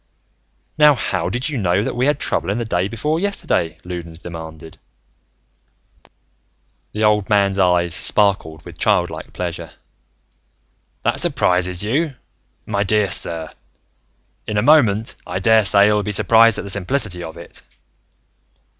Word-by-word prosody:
"Now 150 -1 +7
how 95 -7 -2
did 120 +7 -2
you 145 -5 -3
know 95 0 +1
that - - -3
we 125 +3 +1
had 145 - +2
trouble 100 - -1
the 120 0 -3
day 90 -3 -1
before 150 +9 -2
yesterday?" 90 - -1
Loudons 85 -2 -7
demanded. 80 -2 -10 2.1
The 105 - -2
old 105 -2 +2
man's 100 -2 +2
eyes 90 -2 +2
sparkled 90 -6 0
with - - -12
child - - +1
like - - -8
pleasure. 85 -2 -5 1.3
"That - - 0
surprises 90 0 0
you, 140 +7 -1 0.5
my 100 -2 -2
dear 105 -1 +1
sir? 80 -3 -2 1.0
In 105 - -2
a 105 - +1
moment, 115 -7 +3
I - - -3
daresay 105 -3 +4
you'll 105 0 +2
be 105 - -3
surprised 115 +2 +4
at - - -4
the 100 - -5
simplicity 100 -1 -1
of 80 -1 -8
it. 85 - -11
100 Hz, 135 wpm, -19 LUFS, 90-110 Hz, 2.1 s, Now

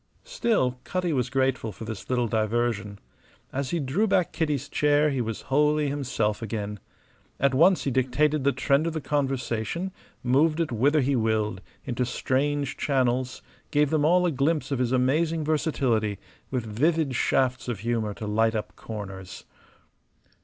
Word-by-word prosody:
Still, 225 - 0
Cutty 180 -3 -1
was 125 -3 0
grateful 130 -3 0
for 110 - -9
this 110 -3 -7
little 125 -2 +1
diversion. 110 -1 -1 0.6
As 135 -1 -2
he 170 - -1
drew 155 +10 +1
back 190 -4 +2
Kitty's 145 -4 -1
chair 150 0 +2
he 135 -2 -1
was 115 -2 -4
wholly 150 +1 +3
himself 120 -7 -1
again. 105 -2 -4 0.6
At 140 0 +3
once 170 +7 +4
he 140 - -1
dictated 135 +3 +1
the 140 - +4
trend 140 +4 +1
of 165 - -2
the 160 - -2
conversation, 135 - -2 0.3
moved 150 +6 +3
it 165 -5 0
whither 140 +6 +3
he 135 +1 +1
willed, 110 -4 0 0.2
into 125 0 -1
strange 135 +3 -1
channels, 130 -2 0 0.3
gave 150 -1 +2
them 155 -2 +2
all 180 +4 +4
a 175 - +2
glimpse 150 +2 0
of 135 - 0
his 125 -1 +1
amazing 155 +6 +1
versatility, 130 -9 0 0.3
with 125 -4 -2
vivid 145 +6 +1
shafts 125 +1 +1
of 115 -6 -3
humour 110 -3 -1
to 110 - -6
light 110 +2 +1
up 105 - -4
corners. 95 -4 -8
130 Hz, 160 wpm, -26 LUFS, 115-150 Hz, 0.6 s, once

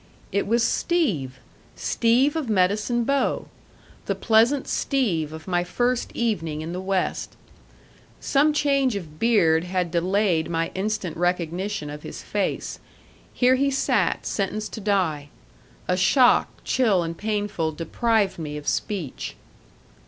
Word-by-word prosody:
It 200 - 0
was 230 +2 +2
Steve! 195 - 0 0.4
Steve 245 +6 +2
of 305 -7 -2
Medicine 210 +4 +2
Bow! 275 +3 0 0.6
The - - 0
pleasant 235 +5 +3
Steve 180 - 0
of 160 +2 -9
my 175 -1 +1
first 245 +6 0
evening 165 -10 -1
in 165 +2 -5
the 180 - -4
West. 190 -1 -2 0.8
Some 290 +2 +3
change 275 -5 +2
of 155 -6 -7
beard 170 -8 +3
had 180 -2 -1
delayed 180 -1 +1
my 165 0 -1
instant 190 -4 -2
recognition 175 0 -1
of 150 0 -8
his - - -8
face. - - -2 0.5
Here 250 0 +3
he 275 +2 +2
sat 270 0 +1
sentenced 210 +1 -2
to 220 - -6
die. 180 -8 0 0.6
A 180 - +2
shock, 245 +7 +4
chill 210 -9 +2
and 165 0 -4
painful, 205 -5 -2
deprived 200 +5 0
me 150 -2 -5
of 150 - -9
speech. 180 -11 -3
195 Hz, 130 wpm, -24 LUFS, 165-235 Hz, 0.8 s, shock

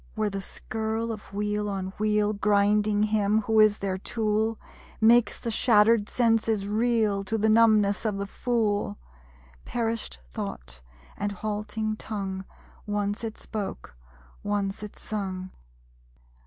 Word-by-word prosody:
Where 215 -2 0
the 195 0 -3
skirl 220 +3 -3
of 215 -3 -8
wheel 210 +1 -1
on 190 -1 -3
wheel, 210 0 +2
Grinding 205 0 +2
him 215 0 +2
who 220 +1 +2
is 215 -1 +6
their 190 -1 -2
tool, 220 0 0 0.4
Makes 230 0 +5
the 230 - -3
shattered 220 -1 +4
senses 225 -4 +2
reel 215 -2 +1
To 220 +3 -1
the 220 +1 +2
numbness 215 -2 +4
of 215 -3 -1
the 200 - -2
fool. 210 - -1 0.7
Perisht 230 -2 -3
thought, - - -6 0.4
and 205 - -1
halting 215 +1 -3
tongue 195 -3 -4 0.4
(Once 205 +1 -1
it 220 -1 -4
spoke; 200 - -6 0.5
once 205 -1 -2
it 210 -1 -8
sung!) 190 -3 -4
210 Hz, 130 wpm, -27 LUFS, 200-220 Hz, 0.7 s, is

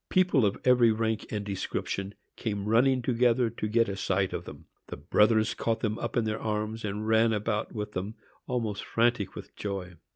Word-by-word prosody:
People 180 - +4
of 100 - -2
every 125 -2 +6
rank 110 0 -1
and 105 -2 -3
description 100 0 -3 0.2
came 105 -3 -3
running 125 +3 +3
together 120 -1 +2
to 110 - -3
get 115 +2 +2
a 100 - -3
sight 95 -1 0
of - - -4
them. - - -11 0.2
Their - - -7
brothers 110 +1 +3
caught 115 -1 -1
them 110 0 -1
up - - -3
in 120 - +3
their 110 0 -2
arms, 110 +1 -2
and 105 +1 -3
ran 110 +1 +4
about 105 0 -2
with 105 -1 -4
them, 100 +3 -4 0.3
almost 115 -5 -2
frantic 115 -3 +1
with - - -10
joy. 95 -3 -4
110 Hz, 190 wpm, -28 LUFS, 105-115 Hz, 0.3 s, every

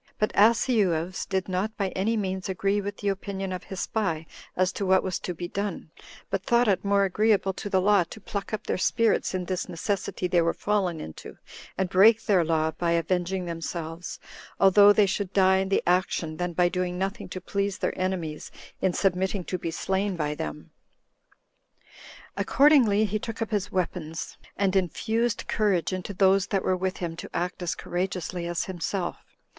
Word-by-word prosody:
But 215 - +1
Asineus 200 -6 +2
did 190 -1 -1
not 195 +4 -2
by 195 -2 0
any 210 +5 0
means 190 -2 -3
agree 195 +2 0
with 205 0 -5
the 205 - -1
opinion 195 0 -3
of 185 0 -5
his 190 -2 -5
spy 165 -8 -1 0.3
as 185 +1 +2
to - - -4
what 190 0 +3
was 185 -2 -2
to 180 - -5
be 175 +1 -5
done, 200 -4 -4 0.4
but 195 - 0
thought 240 +4 +3
it 190 -3 +2
more 200 0 +3
agreeable 200 0 +2
to 205 - -6
the 190 -1 +3
law 200 0 +4
to 220 - -11
pluck 200 -2 -5
up 215 - -4
their - - -1
spirits 225 -1 +1
in 180 -1 -2
this 185 0 -3
necessity 185 +1 -2
they 175 -1 +3
were 165 0 +1
fallen 195 -6 0
into, 80 - -9 0.4
and 190 - +1
break 215 +4 +6
their 190 -4 +4
law 160 -1 +1
by 170 +1 -1
avenging 180 +2 0
themselves, 165 0 -5 0.4
although 200 +1 +7
they 205 0 +5
should 195 0 -2
die 190 -1 +5
in 190 0 -1
the 195 - +2
action, 175 -3 0
than 175 -1 -2
by 175 +1 +3
doing 180 0 -2
nothing 195 +4 -3
to 185 - -5
please 200 +1 -2
their - - -2
enemies 175 -5 -3 0.3
in 185 - +2
submitting 190 +1 0
to 185 +1 -4
be 165 - -3
slain 190 +4 -1
by 150 -3 -1
them. 150 +1 -6 1.6
Accordingly, 255 -8 +4
he 215 +1 -1
took 225 +1 -6
up 225 -1 -3
his 205 -1 -1
weapons, 165 -4 -3 0.2
and 195 -1 +1
infused 220 +5 0
courage 195 -5 +1
into 185 +2 -4
those 195 0 +4
that 195 - 0
were 185 - +2
with 185 +1 -2
him 170 -2 -4
to - - -7
act 175 +2 -2
as 170 -4 -1
courageously 180 -1 -3
as 175 -1 -1
himself. 180 0 -4
190 Hz, 185 wpm, -26 LUFS, 175-200 Hz, 1.6 s, although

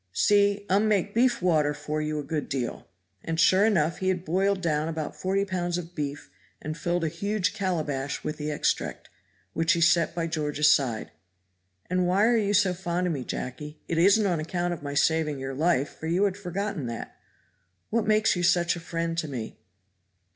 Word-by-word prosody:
See, 205 - +3
um 200 +3 +3
make 205 -1 +1
beef 240 -3 +2
water 155 -5 +2
for 150 +1 -3
you 155 0 -2
a 150 - -3
good 155 +1 -3
deal." 130 -4 -3 0.4
And 165 0 -3
sure 190 +5 +5
enough 170 -6 +1
he 185 - -2
had 185 -1 0
boiled 195 +4 +1
down 155 -3 0
about 160 -2 -4
forty 195 +1 0
pounds 175 -2 -2
of 175 0 -7
beef 145 -2 -5 0.3
and 155 0 -5
filled 175 +2 -1
a - - +1
huge 200 +3 -1
calabash 155 -9 -2
with 150 - -4
the 150 0 -3
extract, 150 - -2 0.4
which 165 +4 +2
he 170 - 0
set 170 -1 +3
by 170 -1 -1
George's 150 -2 +2
side. 125 -7 0 0.8
"And 180 0 +1
why 195 +4 +3
are 240 +1 +4
you 205 -2 +1
so 190 -2 +3
fond 175 0 -2
of 175 - 0
me, 135 -4 -4
Jacky? 150 +5 -6
It 165 - 0
isn't 200 +4 +5
on 175 -4 +1
account 175 +2 -2
of 170 - -7
my 145 -1 -5
saving 155 0 +2
your 135 0 -5
life, 145 -1 0
for 160 - -5
you 175 +4 +2
had 200 -2 +1
forgotten 195 -6 -4
that. 115 0 -6 0.8
What 230 -1 0
makes 215 -1 +3
you 175 - -2
such 175 0 +3
a - - -6
friend 165 0 -3
to 155 - -3
me?" 120 -6 -6
170 Hz, 200 wpm, -26 LUFS, 150-190 Hz, 0.8 s, sure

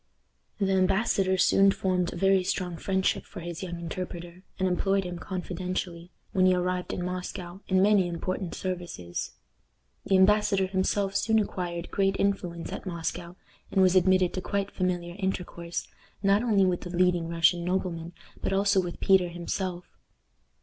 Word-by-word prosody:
The 195 -2 +1
embassador 190 0 +2
soon 195 +2 +5
formed 185 -2 0
a - - -7
very 195 +1 +3
strong 180 -1 -2
friendship 190 +3 0
for - - -10
his 170 -1 -6
young 175 -2 -5
interpreter, 175 +1 -6 0.2
and 190 - +1
employed 195 +2 +1
him 180 -1 -6
confidentially, 180 -2 -4 0.2
when 185 -2 +3
he 185 - +4
arrived 180 0 -1
in 180 - -3
Moscow, 180 0 -5
in 185 0 +3
many 200 -3 +4
important 175 +1 -3
services. 175 - -5 0.7
The 195 - +3
embassador 195 0 +4
himself 195 +1 0
soon 220 +3 +2
acquired 175 -5 -2
great 195 -1 +1
influence 180 -4 -1
at - - -6
Moscow, 170 0 -4 0.4
and 190 - +4
was 185 0 +4
admitted 185 -1 +4
to 185 - -3
quite 200 +1 -2
familiar 175 -2 -2
intercourse, 175 -3 -3 0.4
not 200 +1 +4
only 210 -5 +3
with 180 -1 0
the 180 - -7
leading 175 -1 +2
Russian 170 +1 +3
noblemen, 175 -2 -2 0.3
but - - -1
also 200 0 +3
with 175 -1 -6
Peter 190 -2 +4
himself. 175 +1 -4
185 Hz, 155 wpm, -28 LUFS, 175-195 Hz, 0.7 s, soon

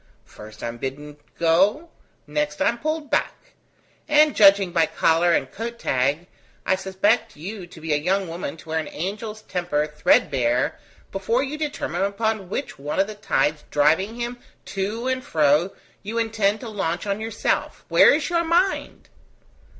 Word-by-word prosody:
First 105 0 -13
I - - -1
am 115 0 -6
bidden 145 +3 -6 0.2
go; 195 - +2 0.3
next 295 0 -2
I 290 - +3
am 235 - -3
pulled 310 0 -3
back; - - -2 0.5
and 300 -1 +4
judging 195 -2 +6
by 165 -2 +3
collar 165 +2 +2
and - - 0
coat 235 +2 -5
tag, 140 - 0 0.4
I - - +3
suspect 190 +4 0
you 185 +4 -7
to 170 - -13
be 160 -1 -2
a - - +3
young 185 +5 0
woman 165 -2 -5
to 160 - -15
wear 160 0 0
an 160 - -4
angel's 210 +5 -5
temper 175 -6 -1
threadbare 135 -5 +1 0.3
before 225 +7 0
you 285 +2 -4
determine 300 -8 -3
upon 200 -1 -1
which 265 - -4
one 145 +6 -3
of 195 - +4
the 215 - -7
tides 155 -7 0
driving 165 +10 +2
him 240 +1 -4 0.3
to 210 +5 -2
and 260 0 -1
fro 155 +1 +3 0.3
you 215 +3 -5
intend 220 -2 +1
to 235 - -6
launch 175 -5 -2
on 200 0 -1
yourself, 225 - -2
Where - - +7
is 300 -1 -1
your 340 -1 +2
mind?" 350 +4 0
195 Hz, 165 wpm, -23 LUFS, 160-235 Hz, 0.5 s, Where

